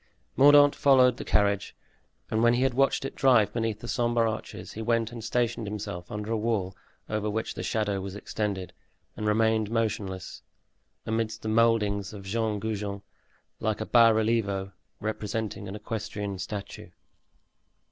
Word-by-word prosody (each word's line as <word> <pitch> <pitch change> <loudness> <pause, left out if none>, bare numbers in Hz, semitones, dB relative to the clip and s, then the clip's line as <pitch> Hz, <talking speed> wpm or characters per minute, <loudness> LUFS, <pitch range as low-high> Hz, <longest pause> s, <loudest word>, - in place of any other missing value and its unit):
Mordaunt 145 +1 +7
followed 130 -3 +4
the - - -5
carriage, 100 -1 +1 0.6
and 110 - +1
when 120 +1 +5
he 125 - +1
had 135 -1 +2
watched 135 +1 +2
it - - -4
drive 125 -6 +4
beneath 115 -2 -2
the 120 - -7
sombre 120 -1 +1
arches 110 - -7
he 110 - -6
went 115 0 0
and 115 -2 -8
stationed 115 -1 -1
himself 100 -4 -6
under 105 +1 -4
a 115 - +1
wall 105 -4 -1 0.3
over 105 0 -2
which 110 +1 -2
the - - -6
shadow 105 -3 -1
was 95 0 -6
extended, 100 -3 -3 0.4
and 105 - -3
remained 110 0 +2
motionless, 105 -5 -3 0.6
amidst 110 0 -2
the 110 - -2
moldings 110 -3 +2
of 100 -2 -9
Jean 110 +1 -1
Goujon, 105 -2 -4 0.6
like 110 -1 -1
a 110 - -3
bas 115 -1 +6
relievo, 105 -4 0 0.3
representing 110 -1 -3
an 95 - -6
equestrian 105 -2 -5
statue. 100 +2 -6
110 Hz, 155 wpm, -27 LUFS, 100-115 Hz, 0.6 s, Mordaunt